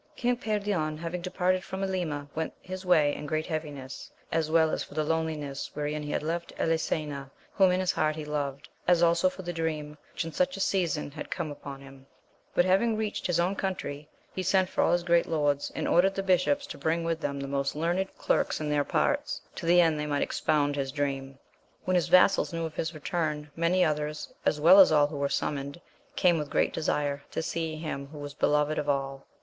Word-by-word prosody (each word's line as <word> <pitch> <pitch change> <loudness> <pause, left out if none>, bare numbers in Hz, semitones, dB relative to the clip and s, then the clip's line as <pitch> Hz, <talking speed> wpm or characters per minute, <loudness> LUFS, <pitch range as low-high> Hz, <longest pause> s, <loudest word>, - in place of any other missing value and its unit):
ING 245 +1 +3
PEEION 205 -9 -1
having 170 +2 -4
departed 185 +1 0
from 190 +1 -5
AKma 170 -7 -2
went 160 0 -3
his 185 +1 -6
way 155 -6 +4
in 150 - -6
great 155 +2 -1
heaviness, 145 -5 -5 0.2
as 160 -1 0
well 160 -1 +4
as - - -1
for - - -13
the 155 - +1
loneliness 155 -3 -2
wherein 150 +1 -2
he 145 - -6
had - - -1
left 170 +2 -3
Elisena 150 -4 -1 0.2
whom 190 -2 +5
in 180 0 +2
his 185 -1 +2
heart 155 0 0
he 155 -1 -6
loved, 140 -2 -3 0.2
as 175 -1 +5
also 170 +2 +4
for 190 - -9
the 175 0 -4
dream 155 -2 -3 0.2
which 160 - -3
in 165 - -5
such 275 - 0
a - - -7
season 170 -7 0
had 150 +1 -7
come 160 -5 -3
uponhim. 135 -1 -11 0.5
Buthavingreached 210 +4 +2
his 175 -2 +1
own 180 +3 +1
country, 155 -7 -4 0.2
he 185 - -2
sent 185 0 +2
for - - +1
all - - +3
his 175 0 +2
great 170 -1 +3
lords, 145 -3 0
and - - -2
ordered 190 +3 +4
the 195 - -2
bishops 195 +10 +2
to 285 - -9
bring 165 +1 0
with 165 -1 -1
them 140 0 -2
the 140 - -4
most 140 0 -1
learned 175 +5 0
clerks - - +1
in 150 -1 -2
their 145 -1 +2
parts, 290 - 0
to 170 - -6
the 175 +1 +6
end 160 -3 +2
they 150 - -2
might 145 -1 +1
expound 145 -1 +1
his 135 -1 -2
dream. 135 -1 -3 0.5
When 185 - +1
his 180 -2 +2
vassals 185 +2 +5
knew 165 -1 -2
of 160 - -6
his 160 +1 -3
return, 150 -1 -2
many 175 +2 +3
others, 150 -1 -2
as 150 - +2
well 175 +6 +8
as 190 - +8
all 150 -2 +5
who 145 0 -5
were 140 0 0
summoned, 140 +3 -2 0.4
came 175 -3 +3
with 150 -1 -4
great - - +1
desire 145 -3 -1
to 160 - -3
see 160 -1 -2
him 155 -3 -5
who 150 +2 -11
was 145 -1 -7
beloved 150 +1 +1
of 150 -1 -2
all. 135 -1 -2
160 Hz, 210 wpm, -28 LUFS, 145-180 Hz, 0.5 s, well